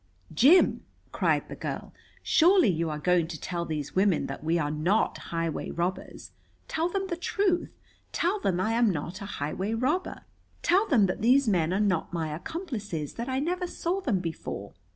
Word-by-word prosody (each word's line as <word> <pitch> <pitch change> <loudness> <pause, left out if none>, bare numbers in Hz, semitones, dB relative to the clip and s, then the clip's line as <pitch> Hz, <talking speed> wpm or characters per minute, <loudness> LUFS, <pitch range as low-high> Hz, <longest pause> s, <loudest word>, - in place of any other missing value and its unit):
"Jim," 285 - +5 0.3
cried - - +1
the - - -7
girl, - - -5 0.3
"surely 355 - +5
you 165 -2 0
are 150 - -3
going 175 +1 +2
to 160 -3 -7
tell 170 -1 -3
these 150 -3 -4
women 190 -2 +3
that - - -6
we 165 +2 +1
are 150 -3 -1
not 170 +8 +1 0.2
highway 165 -2 -2
robbers. 175 +2 -4 0.4
Tell 330 +2 -1
them 390 +1 -2
the 365 -2 -3
truth. 360 +1 0 0.4
Tell 370 +5 0
them 185 - 0
I 220 +4 +1
am 235 -1 +3
not 175 +2 -4
a - - -5
highway 190 +6 -3
robber. 290 +11 -1 0.4
Tell 385 +5 +3
them 230 -8 +4
that 185 - -2
these 255 +3 +4
men 175 -5 +2
are 190 - +1
not 190 -6 +1
my 160 -3 -2
accomplices, 210 - -5
that 235 +3 -5
I 260 - -1
never 355 +6 -1
saw 350 +2 -2
them 250 - +1
before." 165 -3 -6
200 Hz, 180 wpm, -28 LUFS, -, 0.4 s, Jim